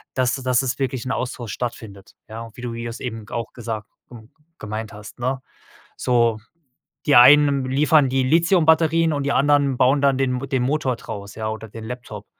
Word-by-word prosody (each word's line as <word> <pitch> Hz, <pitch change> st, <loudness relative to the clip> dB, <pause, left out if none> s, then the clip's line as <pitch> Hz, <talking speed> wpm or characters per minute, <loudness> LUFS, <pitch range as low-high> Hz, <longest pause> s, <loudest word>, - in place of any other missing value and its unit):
dass 130 Hz, -1 st, +1 dB
dass 130 Hz, -2 st, +1 dB
es 130 Hz, +1 st, -3 dB
wirklich 130 Hz, -2 st, -2 dB
'n 130 Hz, -, -3 dB
Austausch 120 Hz, -3 st, -4 dB
stattfindet, 110 Hz, -5 st, -7 dB
ja? 115 Hz, +1 st, -7 dB
Wie 120 Hz, -, -11 dB
du 120 Hz, -, -4 dB
wie 115 Hz, 0 st, -6 dB
du's 115 Hz, 0 st, -7 dB
eben 115 Hz, -3 st, -6 dB
g -, -, -13 dB
auch 115 Hz, -2 st, -4 dB
gesagt, 110 Hz, -3 st, -6 dB, 0.2 s
g 125 Hz, -, -12 dB, 0.4 s
gemeint 110 Hz, +1 st, -6 dB
hast, 105 Hz, +3 st, -12 dB
ne? 130 Hz, +2 st, -2 dB, 0.6 s
So, 115 Hz, -3 st, +1 dB, 0.7 s
die 145 Hz, -, +4 dB
einen 140 Hz, +1 st, +6 dB
liefern 145 Hz, +2 st, +3 dB
die 130 Hz, 0 st, +1 dB
Lithium-Batterien 165 Hz, +1 st, +3 dB
und 145 Hz, -, -2 dB
die 140 Hz, -, -1 dB
anderen 140 Hz, -2 st, +2 dB
bauen 135 Hz, +3 st, +3 dB
dann 140 Hz, -2 st, +3 dB
den 130 Hz, -2 st, 0 dB
M 135 Hz, -, -6 dB
den 130 Hz, -2 st, 0 dB
Motor 135 Hz, -1 st, 0 dB
draus, 100 Hz, -3 st, -8 dB
ja, 110 Hz, -1 st, -3 dB
oder 110 Hz, 0 st, -6 dB
den 110 Hz, +2 st, -9 dB
Laptop. 110 Hz, -4 st, -8 dB
125 Hz, 195 wpm, -22 LUFS, 115-140 Hz, 0.7 s, einen